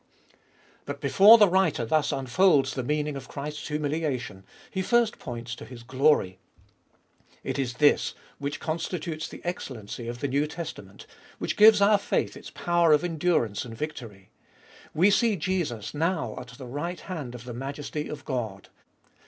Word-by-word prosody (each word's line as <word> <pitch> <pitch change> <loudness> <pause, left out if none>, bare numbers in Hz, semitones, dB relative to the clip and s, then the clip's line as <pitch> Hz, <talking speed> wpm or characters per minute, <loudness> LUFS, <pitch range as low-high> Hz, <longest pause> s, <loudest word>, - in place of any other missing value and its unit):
But 140 0 -5
before 195 +10 +8
the 210 -2 +6
writer 180 -9 +2
thus 155 +5 +1
unfolds 135 +1 +3
the 130 - -2
meaning 150 +3 -1
of 135 -1 -7
Christ's 150 +1 -6
humiliation, 145 - -3 0.3
he 190 - -2
first 235 +3 +2
points 120 0 -6
to - - -8
His 120 -2 -11
glory. 130 -8 +2 1.0
It - - -3
is 125 -2 -2
this 145 +2 +3 0.2
which 145 0 -4
constitutes 165 0 -3
the - - -11
excellency 120 - -5
of 120 +1 -5
the 140 - -1
New 140 +3 +1
Testament, 150 - -8 0.3
which - - -2
gives 210 -1 +7
our 205 0 +5
faith - - -1
its - - -10
power 175 -2 +2
of 150 - +3
endurance 160 - 0
and 115 -2 -9
victory; 115 -10 -7 0.6
we 180 +6 +4
see 225 0 +3
Jesus 165 - -2
now 165 +3 -1
at 125 - -9
the 125 +2 -10
right 155 +8 -4
hand 150 -10 -6
of 120 0 -10
the 125 - -6
Majesty 140 +4 -5
of 145 -2 -8
God. 110 -8 -4
145 Hz, 160 wpm, -27 LUFS, 125-170 Hz, 1.0 s, before